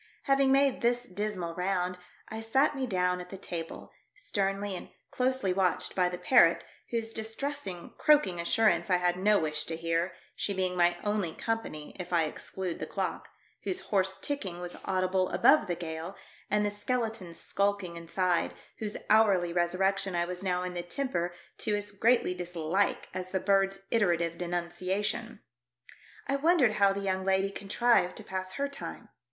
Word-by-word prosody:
Having 275 -1 +3
made 275 0 +3
this 240 +1 +2
dismal 190 -5 -3
round, 180 0 0 0.3
I 220 0 -5
sat 265 +7 +2
me 265 -2 -2
down 180 -3 +1
at 180 - -10
the 195 - -7
table, 165 -3 -6 0.2
sternly 200 - -1
and - - -7 0.2
closely 255 -6 +1
watched 185 -1 +1
by 180 -1 +2
the 180 - -4
parrot, 175 -6 +5 0.3
whose 225 -1 -2
distressing, 220 -4 -4
croaking 210 - +4
assurance 215 +4 +2
I 180 - +5
had 180 0 +2
no 205 +3 +4
wish 155 -1 -1
to 165 - -4
hear, 165 +2 -1 0.2
she 200 - -2
being 185 -1 0
my 175 0 +3
only 205 -6 -1
company 225 -10 -4
if 180 -1 -6
I 170 -2 +4
except 180 +3 -4
the - - -4
clock, - - -3 0.3
whose 375 0 -1
hoarse 190 -1 +2
ticking 195 -12 -3
was 175 0 -6
audible 185 0 +1
above 305 +2 +5
the 175 - 0
gale, 165 +2 -6 0.3
and 210 0 +2
the 205 - 0
skeleton 220 -4 -3
skulking 200 -3 -1
inside, 175 +1 0 0.2
whose 215 -1 -3
hourly 195 -6 +4
resur 175 +1 +1
rection 195 0 +1
I 175 0 +2
was 180 0 -5
now 180 -2 0
in 180 0 -4
the 175 - -2
temper 175 -2 -2 0.3
to 210 -2 +1
as 205 0 -2
greatly 220 -1 +3
dislike 180 +2 -1
as 185 0 -4
the 190 - 0
bird's 195 0 +2
iterative 170 -6 +2
denunciation. 185 +6 -2 0.8
I 275 - +1
wondered 290 -6 +4
how 200 -1 +7
the 200 +1 -3
young 190 -1 -1
lady 190 +1 +2
contrived 200 -1 +2
to - - -8
pass 185 0 -5
her 280 +6 -1
time. 275 -5 -8
190 Hz, 170 wpm, -30 LUFS, 180-220 Hz, 0.8 s, how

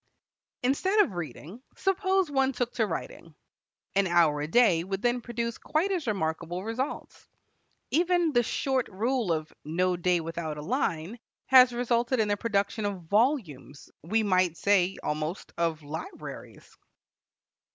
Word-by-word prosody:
Instead 375 +11 +3
of 215 - 0
reading, 175 - -7 0.2
suppose 385 -3 +1
one 270 -1 +2
took 245 -1 -2
to 220 -3 +1
writing: 165 -2 -6 0.6
an 195 -1 +3
hour 165 -4 +3
a 150 - -2
day 175 -3 +4
would 195 +2 -4
then 245 0 +1
produce 235 -1 -4
quite 335 +6 0
as 350 -8 -2
remarkable 175 -2 -2
results. 230 +6 -5 0.6
Even 345 0 +2
the 240 - +5
short 260 +2 -1
rule 230 0 -1
of 155 -1 -2
"no 180 +4 0
day 175 0 +1
without 165 -2 -4
a - - -5
line," 190 - -2 0.3
has 255 -1 +7
resulted 240 +1 0
in 215 -1 +2
the 205 - +2
production 205 0 -1
of 200 -3 -3
volumes 200 - -1
we 220 +8 0
might 185 -4 +2
say 195 -2 +2
almost 155 +4 -3
of 165 -2 -1
libraries. 160 - -9
205 Hz, 140 wpm, -28 LUFS, 170-250 Hz, 0.6 s, has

